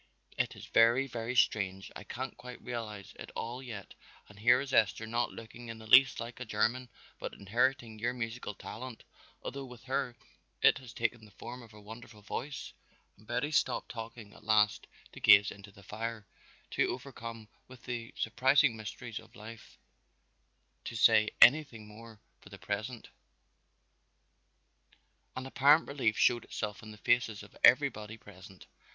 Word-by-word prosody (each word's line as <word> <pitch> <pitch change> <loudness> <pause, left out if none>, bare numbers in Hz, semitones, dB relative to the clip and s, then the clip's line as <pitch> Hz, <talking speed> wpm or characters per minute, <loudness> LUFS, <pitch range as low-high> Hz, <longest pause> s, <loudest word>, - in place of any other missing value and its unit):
It - - -1
is - - -10
very, 120 +4 +4
very 120 -1 -4
strange, 95 -5 +1
I - - -8
can't 130 +4 -6
quite 125 0 -10
realize 110 -5 -6
it - - -8
all 120 +3 -4
yet 110 -7 -8 0.3
and 105 0 -16
here 120 +3 +5
is 135 -1 -5
Esther 110 +1 +3
not 120 +2 -1
looking 115 +1 -10
in 115 0 -7
the 110 - -12
least 125 +5 +7
like 115 +1 -7
a - - -4
German 115 +4 0 0.3
but - - -6
inheriting 115 +2 0
your 120 +3 0
musical 120 -3 -5
talent, 125 +3 -8 0.4
although 135 0 -5
with 125 -2 -13
her 130 -2 -2 0.5
it - - +6
has 125 -3 -11
taken 120 -1 -2
the 105 - -14
form 120 +5 -9
of 115 -2 -14
a - - -12
wonderful 110 0 -12
voice." 135 +6 -5 0.4
And 105 - -22
Betty 125 +5 -1
stopped 130 -4 +1
talking 115 -2 -8
at - - -17
last 105 -1 +2 0.2
to - - -11
gaze 100 +1 +7
into 100 0 -12
the 100 0 -17
fire, 110 +1 -5 0.5
too - - +2
overcome 115 -4 -7 0.2
with 130 -2 -14
the 120 -2 -5
surprising 130 +2 +3
mysteries 110 +1 -7
of 110 +1 -18
life 110 +1 -12 1.1
to - - -6
say 110 -1 +5
anything 125 -5 +6
more 110 +1 -13 0.2
for - - -16
the 100 - -10
present. 110 +4 -5 2.3
An 130 - -5
apparent 145 +4 +4
relief 130 -6 0
showed 120 -2 +3
itself 105 -1 -5
in 110 - -11
the 105 - -11
faces 110 -2 +1
of - - -15
everybody 110 +1 +4
present. 95 -3 -14
115 Hz, 160 wpm, -32 LUFS, 105-125 Hz, 2.3 s, least